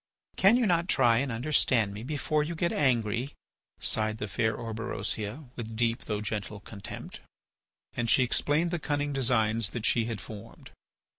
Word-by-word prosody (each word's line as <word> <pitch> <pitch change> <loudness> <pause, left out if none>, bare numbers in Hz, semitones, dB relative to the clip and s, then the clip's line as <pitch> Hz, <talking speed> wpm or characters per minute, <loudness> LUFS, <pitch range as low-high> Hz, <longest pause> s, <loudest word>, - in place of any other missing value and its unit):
"Can 200 +5 +5
you 250 - +2
not 170 -3 +2
try 120 -8 +4
and 140 -1 -1
understand 115 -4 +2
me 105 - -7
before 150 +3 0
you 170 +3 -4
get 170 +1 0
angry?" 120 -1 +1 0.4
sighed 110 0 0
the 105 - -4
fair 110 +2 0
Orberosia 115 +2 -3
with 115 -2 -6
deep 115 +1 0
though 105 -1 -2
gentle 105 -1 -4
contempt. 100 0 -9 0.8
And 120 -1 -1
she 130 - +5
explained 150 +7 +1
the 175 - -1
cunning 145 -1 -1
designs 115 -5 +2
that 120 -2 -4
she 115 -2 +3
had 115 -3 -4
formed. 105 +5 -11
115 Hz, 160 wpm, -29 LUFS, 110-145 Hz, 0.8 s, Can